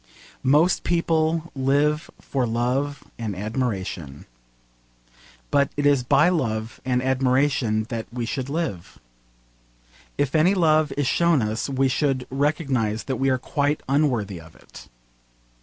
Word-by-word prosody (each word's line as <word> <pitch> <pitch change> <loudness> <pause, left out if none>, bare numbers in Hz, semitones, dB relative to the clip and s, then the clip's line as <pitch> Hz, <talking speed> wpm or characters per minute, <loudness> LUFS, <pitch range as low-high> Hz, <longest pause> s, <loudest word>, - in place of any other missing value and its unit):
Most 150 +7 +3
people 165 -1 0
live 145 +3 +1
for 130 -3 -2
love 125 +5 -1 0.2
and 110 -4 -3
admiration. 95 - -4 1.3
But 140 -1 +3
it 145 - 0
is 145 -2 +4
by 140 +5 +4
love 115 -10 -1
and 125 -1 0
admiration 130 -3 +1
that 115 -3 -4
we 120 -1 -3
should 130 +2 -4
live. 145 - -4 1.2
If 140 -2 0
any 170 +5 +4
love 155 -4 +3
is 145 - +1
shown 165 -1 +3
us 110 +5 -2
we 135 0 +1
should 130 -1 0
recognise 135 -6 0
that 130 -2 -3
we 135 0 +1
are 130 - +2
quite 145 +3 -1
unworthy 125 - 0
of 80 0 -16
it. - - -15
135 Hz, 130 wpm, -23 LUFS, 115-150 Hz, 1.3 s, is